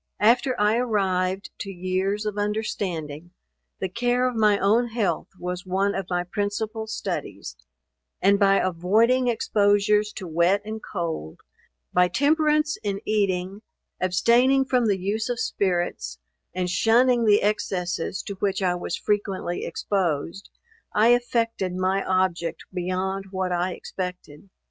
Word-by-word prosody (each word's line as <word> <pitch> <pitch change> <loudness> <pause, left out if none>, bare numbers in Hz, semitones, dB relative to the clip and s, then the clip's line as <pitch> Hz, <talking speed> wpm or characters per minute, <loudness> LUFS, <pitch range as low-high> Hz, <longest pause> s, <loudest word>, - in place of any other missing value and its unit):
After 245 +4 +3
I 210 +2 +3
arrived 195 -5 0
to 200 - -5
years 190 +3 -2
of 210 -1 -2
understanding, 180 -7 -3 0.5
the 190 - -1
care 245 +6 +1
of 250 - -3
my 210 -2 +4
own 220 +5 +2
health 215 -8 -1
was 180 0 -4
one 195 +2 0
of 195 -3 -3
my 175 -1 0
principal 210 +4 -3
studies; - - -5 0.6
and 200 +1 +4
by 195 -1 +5
avoiding 215 +9 +2
exposures 210 -2 +2
to 190 - -7
wet 170 +5 +2
and 220 0 -5
cold, 165 - -5 0.5
by 180 0 +5
temperance 300 - +2
in 200 -1 -2
eating, 195 -2 0 0.4
abstaining 240 +9 +3
from 250 -3 +2
the 200 -2 +2
use 205 +5 -2
of 245 -1 -2
spirits, 175 - -1 0.3
and 180 -1 -2
shunning 235 +4 +3
the 210 -1 +4
excesses 190 -4 -1
to 200 - -5
which 195 -1 0
I 180 -1 +2
was 175 - -3
frequently 200 -4 -2
exposed, 180 -1 -2 0.5
I 215 +2 +5
effected 230 -6 0
my 185 +1 0
object 175 -3 0
beyond 185 +2 -2
what 185 -1 -2
I 180 +1 0
expected. 180 -2 -7
195 Hz, 135 wpm, -24 LUFS, 180-220 Hz, 0.6 s, by